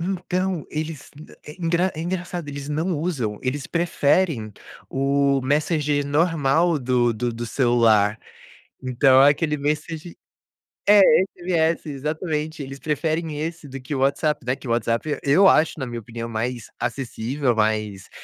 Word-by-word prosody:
Então, 185 Hz, -1 st, -2 dB
eles, 155 Hz, -1 st, -5 dB, 0.2 s
eh, -, -, -16 dB, 0.2 s
é -, -, -17 dB
engra 175 Hz, +2 st, +1 dB
é 155 Hz, -, -5 dB
engraçado, 175 Hz, -1 st, -4 dB
eles 145 Hz, 0 st, -6 dB
não 160 Hz, +3 st, -1 dB
usam. 130 Hz, -, -2 dB
Eles 135 Hz, +2 st, -3 dB
preferem 160 Hz, -, +1 dB, 0.4 s
o 140 Hz, 0 st, +1 dB
Messenger 145 Hz, +1 st, 0 dB
normal 160 Hz, +1 st, +2 dB
do 125 Hz, -2 st, +1 dB
do 120 Hz, +2 st, -2 dB
do 115 Hz, +1 st, -5 dB
celular. 115 Hz, -5 st, +3 dB, 0.6 s
Então, 130 Hz, +1 st, +4 dB
é 140 Hz, -, +7 dB
aquele 150 Hz, +1 st, 0 dB
Messenger 155 Hz, +3 st, -3 dB, 0.7 s
é, 205 Hz, 0 st, +8 dB, 0.4 s
SMS 170 Hz, -2 st, 0 dB
exatamente! 155 Hz, +2 st, -3 dB
Eles 135 Hz, 0 st, -8 dB
preferem 155 Hz, +1 st, -2 dB
esse 160 Hz, 0 st, -5 dB
do 135 Hz, +1 st, -7 dB
que 130 Hz, +3 st, -6 dB
o -, -, -2 dB
WhatsApp, 140 Hz, +1 st, 0 dB
né, 125 Hz, +1 st, 0 dB
que 135 Hz, -, -11 dB
o -, -, -2 dB
WhatsApp. 115 Hz, +5 st, -1 dB
Eu 175 Hz, +8 st, +5 dB
acho, 160 Hz, -3 st, +3 dB
na 130 Hz, -, -2 dB
minha 120 Hz, -1 st, -5 dB
opinião, 115 Hz, +1 st, -7 dB
mais 115 Hz, +1 st, -4 dB
acessível, 130 Hz, 0 st, -2 dB
mais, 105 Hz, -3 st, -1 dB
145 Hz, 150 wpm, -23 LUFS, 125-160 Hz, 0.7 s, é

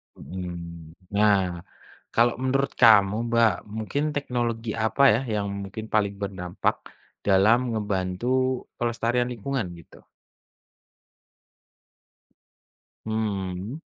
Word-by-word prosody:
Mhm, 85 Hz, -3 st, -8 dB, 0.2 s
nah, 100 Hz, -4 st, +2 dB, 0.6 s
kalau 120 Hz, +1 st, +4 dB
menurut 135 Hz, +1 st, +1 dB
kamu 105 Hz, -4 st, +7 dB
Mbak, 115 Hz, -1 st, +4 dB, 0.2 s
mungkin 110 Hz, +7 st, -2 dB
teknologi 120 Hz, -5 st, -2 dB
apa 140 Hz, +5 st, +2 dB
ya 120 Hz, -, +1 dB
yang 100 Hz, -1 st, -1 dB, 0.2 s
mungkin 105 Hz, +3 st, -7 dB
paling 100 Hz, -2 st, +2 dB
berdampak 95 Hz, -3 st, -2 dB, 0.5 s
dalam 100 Hz, +5 st, +5 dB, 0.2 s
ngebantu 95 Hz, 0 st, -2 dB, 0.5 s
pelestarian 120 Hz, +1 st, 0 dB
lingkungan 125 Hz, -1 st, -3 dB
gitu? 85 Hz, -, -18 dB, 3.0 s
Hmm. 100 Hz, -1 st, -3 dB
105 Hz, 85 wpm, -25 LUFS, 95-120 Hz, 3.0 s, kamu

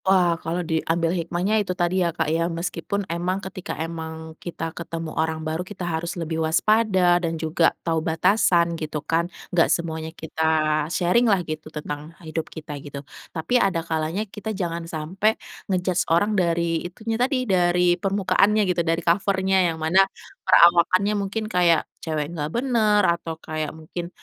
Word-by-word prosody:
Wah, 185 Hz, -3 st, +4 dB
kalau 175 Hz, +2 st, -2 dB
diambil 165 Hz, +1 st, 0 dB
hikmahnya 180 Hz, +5 st, 0 dB
itu 185 Hz, -2 st, -3 dB
tadi 175 Hz, +1 st, +1 dB
ya, 175 Hz, -, +2 dB
Kak, 165 Hz, -1 st, -1 dB
ya. 165 Hz, +1 st, +1 dB
Meskipun 175 Hz, +3 st, -3 dB
emang 175 Hz, +2 st, -2 dB
ketika 190 Hz, 0 st, -6 dB
emang 160 Hz, 0 st, -6 dB
kita 165 Hz, -2 st, -5 dB
ketemu 165 Hz, -1 st, -6 dB
orang 160 Hz, 0 st, -1 dB
baru, 160 Hz, +2 st, -2 dB
kita 185 Hz, 0 st, -6 dB
harus 170 Hz, +1 st, -3 dB
lebih 160 Hz, -1 st, -2 dB
waspada 180 Hz, +1 st, +3 dB
dan 165 Hz, -1 st, -2 dB
juga 160 Hz, +1 st, +2 dB, 0.2 s
tahu 165 Hz, -1 st, +1 dB
batasan 170 Hz, +1 st, +3 dB
gitu 155 Hz, 0 st, -3 dB
kan. 170 Hz, +1 st, 0 dB, 0.2 s
Gak 170 Hz, -2 st, +4 dB
semuanya 160 Hz, -1 st, -1 dB
kita 160 Hz, -1 st, -7 dB, 0.5 s
sharing-lah 185 Hz, +2 st, +2 dB
gitu 155 Hz, -1 st, -6 dB
tentang 150 Hz, +1 st, -7 dB
hidup 160 Hz, 0 st, -4 dB
kita 150 Hz, -3 st, -8 dB
gitu. 140 Hz, 0 st, -8 dB, 0.2 s
Tapi 240 Hz, +10 st, 0 dB
ada 170 Hz, -4 st, +1 dB
kalanya 160 Hz, +5 st, -1 dB
kita 210 Hz, +1 st, -6 dB
jangan 170 Hz, -3 st, -3 dB
sampai 185 Hz, +8 st, 0 dB, 0.3 s
nge-judge 185 Hz, -1 st, 0 dB
orang 175 Hz, +6 st, +3 dB
dari 170 Hz, -3 st, +1 dB
itunya 225 Hz, +6 st, -4 dB
tadi, 255 Hz, 0 st, +1 dB
dari 180 Hz, -3 st, +3 dB
permukaannya 195 Hz, +3 st, +2 dB
gitu, 175 Hz, -, 0 dB
dari 165 Hz, 0 st, -1 dB
cover-nya, 190 Hz, 0 st, +2 dB
yang 165 Hz, -, -4 dB
mana 160 Hz, +4 st, +4 dB, 0.4 s
perawakannya 185 Hz, +2 st, +5 dB
mungkin 205 Hz, +2 st, -2 dB
kayak 175 Hz, -6 st, +3 dB, 0.2 s
cewek 155 Hz, 0 st, -3 dB
gak 150 Hz, -3 st, -3 dB
bener, 220 Hz, -2 st, +2 dB
atau 170 Hz, -2 st, -1 dB
kayak 155 Hz, -1 st, -4 dB
mungkin, 160 Hz, +3 st, -7 dB
170 Hz, 155 wpm, -23 LUFS, 160-190 Hz, 0.5 s, perawakannya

